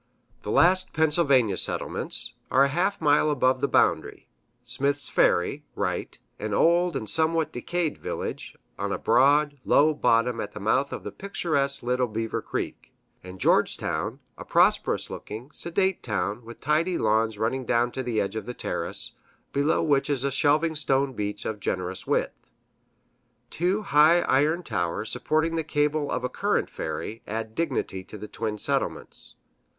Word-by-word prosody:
The - - -7
last 185 - +3
Pennsylvania 145 - +3
settlements - - -2 0.2
are 135 - +5
a 140 - +2
half 185 +7 0
mile 150 0 +3
above 130 -3 +2
the - - +2
boundary - - +1 0.4
Smith's 140 +3 0
Ferry 135 +12 +2
(right), 95 -3 -3 0.2
an 105 0 -2
old 170 0 +3
and 110 -5 -3
somewhat 160 +1 +1
decayed 165 +5 -2
village, - - -5 0.2
on 100 0 -2
a - - -1
broad, 145 +4 +3
low 155 +2 +4
bottom 120 -3 +2
at 105 - -6
the - - -7
mouth 130 +7 +1
of - - -6
the - - -6
picturesque 140 -9 -1
Little 125 +1 +1
Beaver 115 0 -3
Creek;[A] - - -7
and 90 0 -10
Georgetown - - +1
(left), - - -23 0.2
a - - -8
prosperous - - +2
looking, 115 +7 -8
sedate 190 +4 0
town, 105 0 -2
with 115 0 -11
tidy 160 +5 +1
lawns 110 0 +1
running 115 +5 -1
down 120 0 +1
to 130 - -4
the 120 -4 -1
edge 100 +2 -2
of 110 0 -5
the 125 - -5
terrace, - - -2 0.4
below 145 +3 +2
which 145 -3 +2
is 135 -3 0
a 140 - 0
shelving 150 +4 +2
stone 135 -3 +1
beach 105 -2 -4
of 110 -2 -3
generous 95 -1 -3
width. - - -2 1.0
Two 185 +5 0
high 160 -1 +5
iron 155 +6 +2
towers 100 - -2
supporting 165 +1 0
the 160 - 0
cable 150 -1 0
of - - -2
a - - +1
current - - -1
ferry 115 +2 -5
add 110 +1 -4
dignity 105 - -2
to 105 - -10
the 105 - -8
twin 110 -1 -4
settlements. - - -3
135 Hz, 160 wpm, -26 LUFS, 110-155 Hz, 1.0 s, are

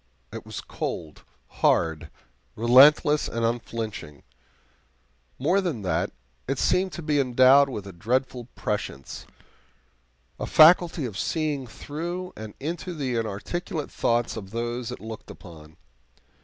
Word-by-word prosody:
It - - -8
was - - -6
cold, 80 -3 -6 0.2
hard, 80 -2 +1 0.5
relentless, 140 +5 +6
and 115 0 -2
unflinching. 115 - -4 1.1
More 195 +3 +2
than 155 - -3
that, 90 - -1 0.4
it - - -1
seemed 185 +1 +1
to 170 - -6
be 150 -1 +1
endowed 130 +2 +5
with 105 -6 -6
a 100 - -9
dreadful 125 +6 -1
prescience 105 - -5 1.1
a - - -3
faculty 165 -1 +6
of 110 -4 -5
seeing 150 -5 -2
through 175 +9 -6
and 110 -1 -9
into 170 +4 -4
the 135 -5 -2
inarticulate 115 - -4
thoughts 120 0 0
of 100 -4 -7
those 120 +2 -3
it - - -8
looked 110 0 -9
upon. 80 -4 -13
125 Hz, 125 wpm, -25 LUFS, 110-150 Hz, 1.1 s, relentless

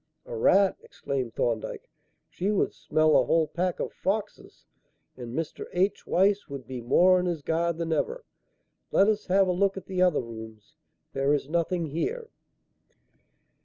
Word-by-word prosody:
"A - - -7
rat!" 200 - +4
exclaimed 130 -4 -5
Thorndyke. 115 -2 -2 0.4
"She 190 - -3
would 210 - +1
smell 155 0 +2
a - - +6
whole 165 -1 +3
pack 175 +3 -2
of - - -3
foxes, 205 +2 -4 0.5
and 120 -1 -8
Mr. 165 -2 -4
H. 190 +3 0
Weiss 200 +2 +2
would 140 -3 -7
be 130 -2 -6
more 180 +10 +4
on 180 - -1
his 165 -4 -3
guard 170 +1 0
than 165 -1 -1
ever. 475 - -2 0.7
Let 195 - +4
us 215 -1 0
have 190 +1 +4
a - - +2
look 195 +2 +1
at 190 - -7
the 185 -1 -2
other 180 -4 +3
rooms; 110 -2 -10 0.4
there 135 +2 +2
is 140 - -3
nothing 170 +2 0
here." 445 - -3
170 Hz, 165 wpm, -27 LUFS, 140-195 Hz, 0.7 s, a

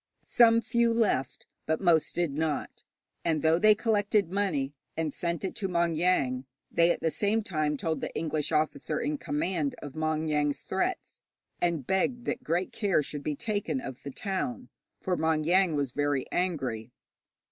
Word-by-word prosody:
Some 230 -1 +5
few 235 0 +2
left, 210 - 0 0.2
but 160 0 +1
most 170 -4 +3
did 175 -5 0
not, 155 0 -2 0.4
and 160 -3 0
though 160 +1 +4
they 215 +1 +6
collected 205 -4 +1
money, 165 -9 0 0.2
and 160 -3 -1
sent 170 -2 -2
it 190 - -2
to 195 - -1
Maung 170 -2 +1
Yaing, 140 -7 +1 0.3
they 170 0 +4
at - - 0
the 160 - +1
same 215 +5 +1
time 155 -6 -1
told 160 +2 -2
the - - -3
English 155 -2 -1
officer 155 -1 0
in 150 0 -2
command 155 0 -1
of 145 -2 -8
Maung 155 0 -1
Yaing's 150 -1 0
threats, 275 - -3 0.4
and 170 -6 0
begged 240 - 0
that 255 - -2
great 180 -2 -1
care 195 -8 +1
should 145 0 -5
be 150 +1 -2
taken 210 - -2
of 135 - -7
the 140 - -6
town, 230 - -3 0.3
for 185 -2 -1
Maung 160 -1 +1
Yaing 180 -1 +3
was 140 -3 -1
very 145 -1 0
angry. 135 -11 -1
165 Hz, 170 wpm, -29 LUFS, 150-200 Hz, 0.4 s, they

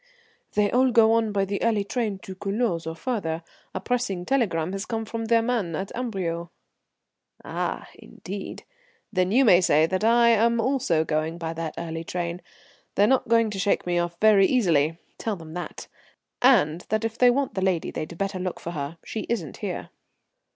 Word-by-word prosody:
"They 210 -1 +2
all 255 +1 +4
go 225 -2 +5
on 225 -2 +2
by 200 -1 +1
the 200 +1 -3
early 220 -3 +2
train 215 -1 -2
to 190 - -7
Culoz 195 -3 -2
or 160 - -4
farther. 165 -5 -3 0.3
A - - -1
pressing 195 -4 -2
telegram 185 -11 0
has 195 +1 -4
come 225 -1 -3
from 225 +1 -4
their 230 0 +3
man 225 -9 -1
at 190 +4 -4
Amberieu." 185 -9 -3 1.0
"Ah! - - -3
Indeed. 195 +1 -8 0.5
Then 185 -1 +1
you 260 +5 +5
may 185 -5 +7
say 155 -3 +4
that 185 +4 -2
I 235 +1 +5
am 235 +1 +3
also 225 - +1
going 155 +2 -1
by 165 -1 -4
that 165 -1 -5
early 165 -1 -4
train. 175 +1 -4 0.5
They're 200 - +5
not 260 +4 +2
going 230 -2 +3
to 195 - -4
shake 200 +1 +1
me 175 -1 +1
off 175 0 -2
very 210 -3 +6
easily. 165 - +2 0.2
Tell 220 -2 -2
them 160 -3 -11
that, 175 0 -6 0.5
and 185 - +4
that 215 +1 0
if 225 +1 -4
they 250 - +7
want 270 +2 0
the 190 - -2
lady 185 -3 0
they'd 160 +2 -6
better 195 0 -2
look 180 -1 -3
for 170 - -6
her. 150 0 -5
She 220 - -5
isn't 185 - -3
here." - - -5
195 Hz, 185 wpm, -25 LUFS, 170-230 Hz, 1.0 s, may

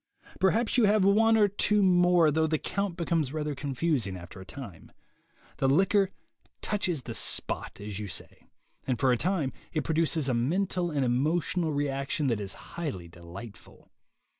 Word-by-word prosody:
Perhaps 220 +6 +2
you 230 - +5
have 205 -1 +4
one 225 +3 +5
or 210 -1 +5
two 205 +1 +2
more, 175 -3 +5
though 160 +1 +2
the 155 0 +1
count 200 +2 -3
becomes 165 -5 0
rather 150 -1 -2
confusing 135 - -1
after 90 +1 -10
a - - -10
time. 115 -11 -10 0.7
The 135 - +2
liquor 195 +6 +3 0.5
"touches 185 -9 -1
the 115 - -6
spot," - - -1
as 105 -1 -6
you 105 - -4
say, 95 - -8 0.4
and 130 -2 0
for 130 +1 +3
a - - +4
time 160 -1 -1 0.2
it 155 -3 -1
produces 160 -2 0
a 130 - +1
mental 175 +8 0
and 145 -4 0
emotional 155 +6 0
reaction 140 0 -1
that 105 - -3
is 100 -1 -4 0.2
highly 130 - -4
delightful. 85 +6 -12
155 Hz, 165 wpm, -28 LUFS, 125-185 Hz, 0.7 s, you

